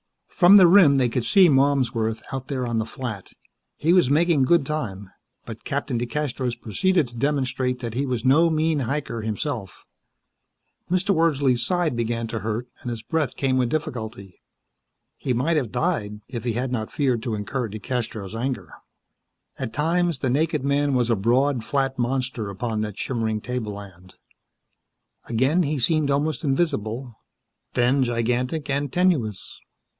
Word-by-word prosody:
From 185 +2 +7
the 190 - +8
rim 170 -5 +7
they 130 -3 +2
could 115 0 -2
see 195 -3 +6
Malmsworth 130 -6 +1
out 130 -1 -4
there 130 -3 -2
on 115 -1 -1
the 110 - -1
flat. 110 -5 -6 0.4
He 165 +3 +2
was 180 -8 +4
making 160 0 +3
good 165 0 +3
time, 105 -11 -4 0.3
but - - -9
Captain 120 - -2
DeCastros 125 -2 -2
proceeded 165 - +1
to 120 - -15
demonstrate 130 -1 -1
that 115 -3 -4
he 135 +4 -1
was 125 -2 -2
no 155 +6 +5
mean 160 -1 +1
hiker, 130 -2 -3
himself. 110 - -4 1.0
Mr. 185 +3 +2
Wordsley's 140 -7 +2
side 175 -1 0
began 115 0 -1
to 115 0 -4
hurt, 110 +4 -3
and 125 - -5
his 115 -2 -5
breath 155 -3 -1
came 130 -1 0
with 125 -2 +1
difficulty. 110 - -5 0.8
He 130 - -1
might 150 +7 +1
have 125 -8 -1
died, 120 -8 -1
if 120 -4 -6
he 120 - 0
had 125 +3 -2
not 110 -4 -3
feared 130 -6 0
to 115 -2 -2
incur 115 +4 -3
DeCastros' 110 -2 -4
anger. 125 +3 -4 0.9
At 130 -4 -3
times 165 +4 +1
the 130 -2 -1
naked 150 0 0
man 140 0 +1
was 120 -1 +1
a - - +4
broad, 120 +5 +1
flat 135 +1 -1
monster 125 -3 -1
upon 110 +2 -3
that 105 -1 -4
shimmering 110 -4 -2
tableland. 100 -7 -6 1.1
Again 130 +9 +2
he 150 -2 0
seemed 155 +3 +1
almost 145 +2 0
invisible; 135 -5 -1 0.6
then 125 +3 +3
gigantic 125 +5 -1
and 140 0 -1
tenuous. 145 - 0
125 Hz, 155 wpm, -24 LUFS, 115-145 Hz, 1.1 s, the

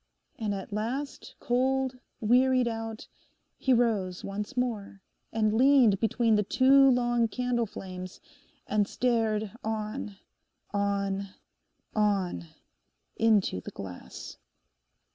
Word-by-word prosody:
And 210 -3 -1
at 195 +1 -7
last, 250 +7 -4
cold, 260 +1 0 0.2
wearied 250 +2 +4
out, 225 -1 -5 0.5
he 265 - +1
rose 215 -7 +1
once 210 +6 -5
more 220 -6 -2 0.3
and 215 -1 +1
leaned 245 -4 +5
between 230 +1 +2
the 210 - +4
two 270 +5 +5
long 240 -2 +2
candle 245 0 -1
flames, 185 -2 -8 0.5
and 210 -1 +1
stared 220 -4 0
on—on—on, 200 - -3 0.7
into 210 - +2
the - - -7
glass. 95 -2 -9
220 Hz, 95 wpm, -28 LUFS, 200-245 Hz, 0.7 s, leaned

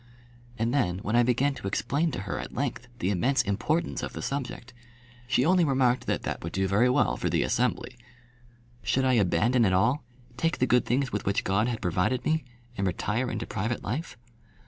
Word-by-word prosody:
And 115 +2 0
then, 90 -11 +1
when 110 - -1
I 120 - +6
began 125 +4 +2
to 100 - -6
explain 140 +12 0
to 125 - -4
her 95 - -4
at - - -7
length 125 -1 -3
the 95 -3 0
immense 125 +9 +2
importance 125 - -1
of - - -5
the - - -6
subject, 130 -2 -4 0.5
she 130 +1 +2
only 180 +1 +4
remarked 130 -4 +2
that - - -1
that - - -4
would 85 - -5
do 95 0 +1
very 105 +6 +3
well 125 - +2
for - - -1
the - - +1
Assembly. 125 0 -1 0.9
Should 135 0 +1
I 130 - +3
abandon 115 +3 +3
it 95 -4 +3
all, 125 +11 +2 0.3
take 165 +5 0
the 130 - +2
good 125 0 +3
things 130 +1 +1
with 105 -2 -3
which 100 - +1
God 100 +4 +1
had 120 -3 -3
provided 90 +9 0
me, 160 0 +1 0.3
and 100 -2 -1
retire 110 +7 -1
into - - -3
private 115 +4 -3
life? 130 +4 -4
120 Hz, 200 wpm, -27 LUFS, 100-135 Hz, 0.9 s, I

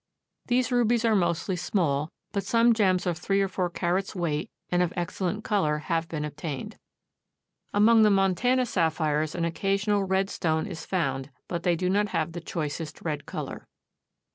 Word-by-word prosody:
These 250 +1 +2
rubies 240 -1 +2
are 225 - +4
mostly 175 0 +1
small, 155 -5 0 0.2
but 200 -1 -1
some 235 0 +4
gems 190 -5 +2
of 175 -2 -1
three 195 +2 +1
or 195 - +2
four 185 -1 -1
carats' 180 +3 -1
weight 165 -5 -1 0.2
and 175 0 +3
of 180 -1 +1
excellent 180 +4 -2
color 155 -8 +1
have 165 +1 -2
been 150 -2 -3
obtained. 150 -2 -6 0.9
Among 220 +2 +5
the 215 - +6
Montana 200 +6 +3
sapphires 155 -5 0
an 170 -1 0
occasional 195 +4 +1
red 190 +1 +1
stone 160 -1 0
is 180 -6 -7
found, 135 -7 -1 0.2
but 170 -1 -3
they 175 0 +2
do 180 +2 -1
not 205 +3 +2
have 165 -4 -1
the 175 +1 -6
choicest 155 -1 -4
red 150 -3 -3
color. - - -6
180 Hz, 165 wpm, -27 LUFS, 160-200 Hz, 0.9 s, the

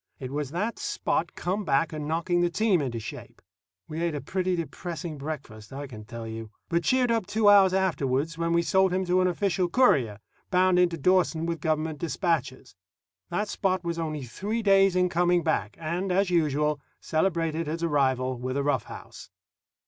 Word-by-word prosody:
It 130 -1 -7
was 145 -1 -3
that 200 +9 -3
Spot - - -1
come 190 +4 -2
back 150 0 +1
and 150 -1 -4
knocking 170 +2 0
the 175 - +2
team 190 -1 +2
into 120 -4 -3
shape. 110 - -9 0.5
We 160 +1 -5
ate 170 -2 0
a - - -2
pretty 185 +5 -1
depressing 170 -2 -5
breakfast, 135 -8 -7
I 140 +2 -6
can 110 -6 -10
tell 115 +1 -7
you; 110 0 -6 0.2
but 170 0 +1
cheered 250 +4 +2
up 225 -5 0
two 215 -1 +3
hours 195 -2 +7
afterward 160 -6 0
when 165 0 -2
we 170 0 +3
sold 190 +3 +3
him 185 +1 0
to 180 +1 +2
an 185 - +3
official 180 0 0
courier, 135 - +3 0.3
bound 185 -1 +3
in 180 -1 +5
to 170 - -5
Dawson 170 0 +2
with 165 -1 -3
government 155 -1 -1
dispatches. 165 -7 -2 0.6
That 210 +5 -1
Spot 185 -3 -1
was 170 -1 -3
only 155 -3 -3
three 205 - -3
days 195 -2 +5
in 180 0 +3
coming 175 -1 +2
back, 110 - -1
and, 175 +4 -2
as 190 0 +2
usual, 150 -3 +1 0.2
celebrated 165 -1 0
his 165 +2 -3
arrival 130 -5 +1
with 130 +2 -3
a 140 - 0
rough 145 - 0
house. - - -11
170 Hz, 185 wpm, -27 LUFS, 145-185 Hz, 0.6 s, hours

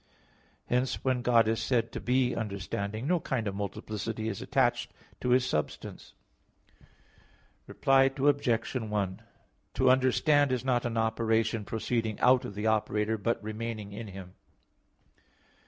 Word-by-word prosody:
Hence 125 +1 -1
when 130 -2 +1
God 120 -2 +4
is 115 0 0
said 120 -3 0
to - - -5
be 125 0 +1
understanding, 100 +1 -4
no 175 +3 +2
kind 125 -7 -2
of 100 - -2
multiplicity 105 +2 -4
is 100 - -5
attached - - +1 0.3
to 125 - -2
His 125 +1 +4
substance. 75 -11 -4 1.5
Reply 135 0 +3
Obj. 135 -5 +1
1: 105 -5 -2 0.5
To 130 -1 +3
understand 130 +2 +3
is 130 0 -1
not 125 -2 +1
an 115 -1 -3
operation 110 0 +1
proceeding 110 0 -2
out 125 0 +4
of 100 - -7
the 105 +1 -3
operator, 110 0 +1
but 115 +1 -1
remaining 110 -1 -5
in 110 +2 -6
him. 95 -2 -10
115 Hz, 135 wpm, -29 LUFS, 105-125 Hz, 1.5 s, God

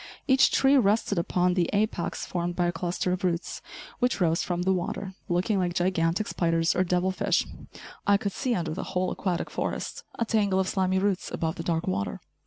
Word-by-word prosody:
Each 265 0 +5
tree 275 +1 +4
rested 210 -4 +2
upon 180 +1 +1
the 175 -2 +1
apex 205 -4 -1
formed 175 -1 -2
by 175 - +1
a 175 - +1
cluster 175 +2 -2
of 180 0 -2
roots, 175 -1 -1 0.4
which 250 -3 +1
rose 165 -2 +2
from 175 -1 -2
the 190 +1 +3
water, 190 +2 -3 0.2
looking 185 +4 +1
like 175 -1 -1
gigantic 175 +2 +1
spiders 165 -1 +1
or 185 - +3
devil 180 +1 +1
fish. 185 - +1 0.6
I 200 0 +6
could 200 0 -3
see 245 +4 -1
under 165 -3 -2
the 190 - -4
whole 185 0 +1
aquatic 180 -3 -2
forest, - - -3
a 230 - 0
tangle 205 -4 +2
of 190 - +1
slimy 190 -1 +1
roots 195 -1 0
above 160 -1 -1
the 175 - -6
dark 165 -1 -1
water. 100 +2 -2
180 Hz, 195 wpm, -27 LUFS, 175-195 Hz, 0.6 s, I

